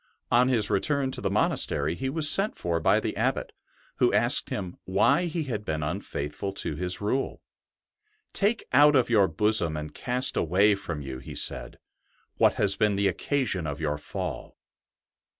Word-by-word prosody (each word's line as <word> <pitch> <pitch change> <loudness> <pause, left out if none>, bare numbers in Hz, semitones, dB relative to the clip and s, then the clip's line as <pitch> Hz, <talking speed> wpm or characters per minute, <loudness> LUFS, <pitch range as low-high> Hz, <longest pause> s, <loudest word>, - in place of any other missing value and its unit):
On 125 +2 +4
his 120 -5 +1
return 140 +5 0
to - - -6
the - - -1
monastery 75 +3 0
he 130 +9 -4
was 155 +2 +3
sent 195 +7 +5
for 85 -1 -2
by - - +3
the - - -4
Abbot, - - -2 0.5
who - - +3
asked - - +4
him 95 -4 -5
why 100 - +2
he 165 -1 -3
had 115 -7 -5
been 80 -5 -3
unfaithful 75 +5 -5
to 80 - -5
his 90 +4 -2
Rule. 120 +7 -2 0.4
" 430 0 -44
Take 220 +3 +1
out 145 +2 +6
of 125 -3 +2
your 100 -4 +4
bosom 85 -3 +1
and 75 0 -7
cast 125 +1 +1
away 95 +6 +3
from 80 -6 -5
you," 65 -2 -7
he 65 - -10
said, - - -3 0.3
'' - - -41
what - - +4
has 100 -1 +2
been 105 -1 +1
the 100 0 +1
occasion 95 - -1
of 70 -1 -5
your 75 -2 -2
fall." - - -6
100 Hz, 180 wpm, -26 LUFS, 80-130 Hz, 0.5 s, out